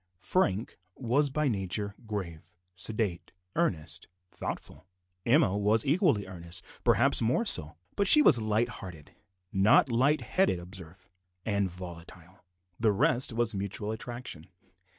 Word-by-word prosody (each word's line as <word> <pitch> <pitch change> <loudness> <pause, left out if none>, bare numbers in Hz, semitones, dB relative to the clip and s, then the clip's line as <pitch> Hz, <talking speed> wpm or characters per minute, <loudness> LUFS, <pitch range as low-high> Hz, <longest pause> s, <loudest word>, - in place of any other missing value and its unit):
Frank 105 - 0 0.2
was 135 +4 +1
by 150 +2 0
nature 100 -2 -2
grave, 90 -5 -6 0.2
sedate, 95 -1 -2 0.2
earnest, 80 - -1 0.2
thoughtful. - - -7 0.4
Emma 95 - +4
was 105 +2 +2
equally 145 - +2
earnest 90 -1 -5
more 120 - +2
so - - +2
perhaps 75 - -10 0.3
but 200 - +1
she 300 +8 +8
was 120 - +6
light 110 +2 +1
hearted 85 -10 -10 0.4
(not 100 +6 +4
light 135 +6 +3
headed, 190 - +1
observe) 90 +1 -9 0.3
and 100 -3 0
volatile. 90 0 -11 0.4
The 110 -2 +3
result 120 +5 +3
was 115 0 0
mutual 100 +2 -3
attraction. 120 -7 -7
100 Hz, 125 wpm, -29 LUFS, 90-120 Hz, 0.4 s, she